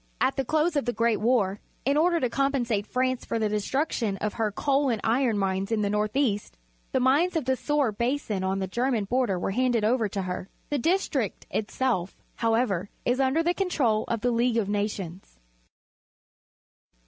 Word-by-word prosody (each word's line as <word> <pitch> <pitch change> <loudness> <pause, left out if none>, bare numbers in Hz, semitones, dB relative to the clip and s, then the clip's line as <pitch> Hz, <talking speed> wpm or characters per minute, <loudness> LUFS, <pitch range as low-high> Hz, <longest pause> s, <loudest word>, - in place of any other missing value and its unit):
At 260 +1 +2
the 270 - 0
close 310 +5 +1
of 285 - +1
the 240 - 0
Great 230 -2 +1
War, 210 -4 +2 0.3
in 275 +2 +2
order 335 +2 +3
to 255 - +1
compensate 240 -5 0
France 255 0 0
for - - -2
the 220 -1 +1
destruction 210 0 -1
of 210 +2 -2
her 220 -2 -1
coal 275 +5 +1
and 230 -3 0
iron 230 -1 +2
mines 195 +1 -1
in 215 -2 +1
the 200 - 0
north 210 +1 -1
east, 225 -8 0 0.3
the - - +2
mines 290 +8 +3
of 315 -5 0
the 260 - +2
Soar 290 -3 +1
Basin 235 -3 -1
on 190 +1 0
the 195 - -1
German 235 +3 0
border 240 -3 +1
were 180 - -2
handed 245 0 +1
over 225 -1 +2
to 195 -1 -3
her. 180 +1 -5 0.2
The 290 - +1
district 285 - 0
itself, 215 -4 -1 0.2
however, 225 -5 +1 0.2
is 245 +2 +1
under 270 +5 +2
the 345 +1 +2
control 275 - +1
of 230 -2 -2
the 245 - +1
League 235 0 +2
of 215 -4 +1
Nations. 200 - -4
235 Hz, 185 wpm, -26 LUFS, 205-265 Hz, 0.3 s, order